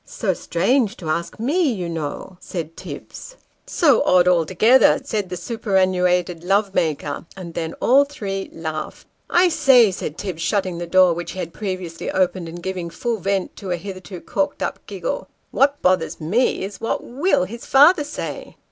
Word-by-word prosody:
" - - -45 0.2
So 200 -5 +1
strange 220 +7 0
to 160 -3 -3
ask 170 +5 -3
me, 295 +6 +1
you 185 -6 -3
know," 165 +2 -5
said 165 -3 -6
Tibbs. - - -9 0.2
" - - -43
So 285 -9 +3
odd 180 -1 +4
altogether! 185 +8 +4
" - - -20
said 215 -8 -3
the 180 - -4
superannuated 180 -3 0
love 195 +2 +1
maker; 150 -1 -2
and 175 -3 -8
then 165 -1 -3
all 270 +3 +4
three 195 -9 -5
laughed. 160 -1 -6 0.2
" - - -43
I - - +6
say," 265 - +5
said 160 -4 -5
Tibbs, 185 -5 -5
shutting 185 0 -1
the 175 - -5
door 185 0 +5
which 170 0 -5
he 190 - -7
had 165 -2 -5
previously 185 -5 -5
opened, 185 -2 0
and 170 +1 -9
giving 185 -2 -4
full 235 +6 -2
vent 195 0 -1
to 195 - -7
a 175 - 0
hitherto 185 -1 -8
corked 290 0 -2
up - - -3
giggle, - - -4
" - - -45
what 280 +1 +2
bothers 170 -3 +1
me 195 +11 +1
is, 200 0 -9
what 225 - -2
ivill 275 - +1
his 235 +5 -9
father 295 +5 +6
say 295 - -7
185 Hz, 185 wpm, -21 LUFS, 170-230 Hz, 0.2 s, I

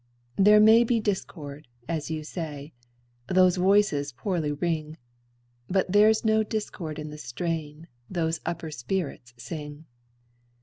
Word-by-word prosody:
There 210 +2 +6
may 220 +2 +7
be 235 0 +1
discord, 155 - -4 0.2
as 160 -2 -3
you 155 -1 -3
say; 150 -2 -6 0.5
Those 185 -1 +4
voices 185 -7 +3
poorly 160 +2 -2
ring; 155 0 -2 0.7
But 190 -1 +1
there's 215 +2 +4
no 220 0 +4
discord 205 -7 -4
in 150 -1 -6
the 150 - -9
strain 155 +4 -4 0.2
Those 165 -3 -1
upper 165 -2 -4
spirits 125 -3 -4
sing. 150 +4 -8
165 Hz, 125 wpm, -26 LUFS, 150-195 Hz, 0.7 s, may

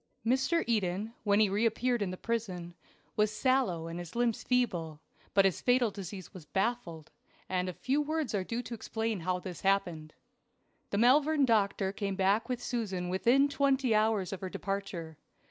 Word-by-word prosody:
MR. 265 +7 +2
EDEN, 210 -1 0
when 205 -1 +3
he 215 - +5
reappeared 230 +4 +1
in 200 - 0
the 185 - -5
prison, 185 -7 -3 0.4
was 210 0 +3
sallow 220 -8 +1
and 165 +1 -5
his 175 +2 -8
limbs 235 -2 +1
feeble, 175 -12 0 0.4
but 195 -1 +6
his 190 - +1
fatal 245 -3 +3
disease 190 -1 -8
was 185 - -10
baffled, 190 -7 -2 0.4
and 185 0 -1
a - - -4
few 270 - 0
words 300 -5 -2
are 200 -3 0
due 235 +5 -3
to 230 +1 -7
explain 225 -1 -3
how 180 +2 -1
this 180 -1 -7
happened. 175 -6 0 0.7
The 200 - -1
Malvern 280 +5 +4
doctor 200 -4 +2
came 200 -1 -3
back 200 +5 +2
with 245 -1 -2
Susan 195 -7 -2
within 240 +9 +4
twenty 275 -4 +2
hours 215 -3 +2
of 190 - -6
her 190 - -4
departure. 185 -5 -4
210 Hz, 170 wpm, -31 LUFS, 185-240 Hz, 0.7 s, but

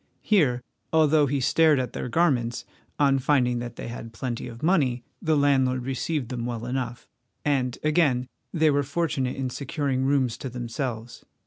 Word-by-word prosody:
Here, 140 - +3 0.3
although 155 -2 +4
he 140 +1 0
stared 155 +3 +4
at 125 - -3
their - - -4
garments, 125 -6 +1 0.3
on 140 -2 +3
finding 125 -3 +2
that 120 -1 -6
they - - -6
had 115 -1 -7
plenty 120 0 -4
of 115 +1 -10
money, 140 -9 +2 0.2
the 160 -2 +2
landlord 130 -3 +2
received 135 0 -2
them 125 -2 -3
well 120 -1 -4
enough, 125 -1 -4 0.4
and 130 -4 +1
again 150 -5 +2 0.3
they 160 -3 +3
were 145 0 +2
fortunate 140 -3 -1
in 130 -2 -3
securing 135 0 -2
rooms 130 -4 +1
to 130 - -5
themselves. 120 -1 -5
130 Hz, 160 wpm, -26 LUFS, 120-145 Hz, 0.4 s, although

